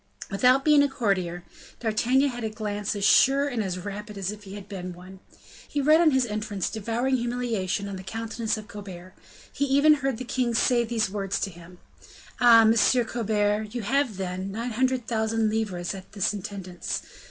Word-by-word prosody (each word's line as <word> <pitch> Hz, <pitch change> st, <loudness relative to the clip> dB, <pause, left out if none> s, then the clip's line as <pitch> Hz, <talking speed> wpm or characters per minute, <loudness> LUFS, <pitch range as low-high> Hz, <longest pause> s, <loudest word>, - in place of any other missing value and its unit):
Without 255 Hz, +7 st, +3 dB
being 300 Hz, -2 st, +6 dB
a 285 Hz, -, +2 dB
courtier, 185 Hz, -9 st, -1 dB, 0.4 s
D'Artagnan 245 Hz, +5 st, +2 dB
had 245 Hz, -2 st, -6 dB
a 220 Hz, -, -1 dB
glance 210 Hz, -1 st, -3 dB
as 200 Hz, -1 st, -1 dB
sure 275 Hz, +5 st, +5 dB
and 245 Hz, -6 st, -2 dB
as 185 Hz, -2 st, -3 dB
rapid 205 Hz, +2 st, -7 dB
as 195 Hz, 0 st, -2 dB
if 210 Hz, -1 st, -11 dB
he 195 Hz, +1 st, -9 dB
had 200 Hz, -1 st, -9 dB
been 185 Hz, -3 st, -6 dB
one. 185 Hz, +2 st, -13 dB, 0.5 s
He 290 Hz, -, -3 dB
read, 305 Hz, +4 st, +5 dB
on 335 Hz, -, +6 dB
his 265 Hz, -3 st, +2 dB
entrance, 210 Hz, -3 st, -3 dB
devouring 235 Hz, +4 st, -1 dB
humiliation 230 Hz, -5 st, -2 dB
on 195 Hz, -1 st, -5 dB
the 185 Hz, -, -9 dB
countenance 225 Hz, +2 st, -3 dB
of 215 Hz, 0 st, -9 dB
Colbert. 185 Hz, -3 st, -10 dB, 0.4 s
He 280 Hz, -, 0 dB
even 285 Hz, +3 st, +5 dB
heard 270 Hz, -4 st, -1 dB
the 255 Hz, -, -5 dB
king 240 Hz, -1 st, -1 dB
say 240 Hz, +1 st, +3 dB
these 225 Hz, -4 st, -1 dB
words 200 Hz, -1 st, -2 dB
to 195 Hz, -, -2 dB
him: 175 Hz, +1 st, -14 dB, 0.6 s
"Ah! 235 Hz, -2 st, +8 dB
Monsieur 230 Hz, +3 st, +4 dB
Colbert; 215 Hz, -1 st, -1 dB
you 240 Hz, -, -3 dB
have 265 Hz, -1 st, 0 dB
then 185 Hz, 0 st, -4 dB
nine 230 Hz, +4 st, -4 dB
hundred 255 Hz, +1 st, 0 dB
thousand 220 Hz, -1 st, 0 dB
livres 200 Hz, -6 st, -2 dB
at 190 Hz, -1 st, -11 dB
the 200 Hz, -3 st, +1 dB
intendance?" 190 Hz, -2 st, -5 dB
215 Hz, 185 wpm, -26 LUFS, 195-245 Hz, 0.6 s, Ah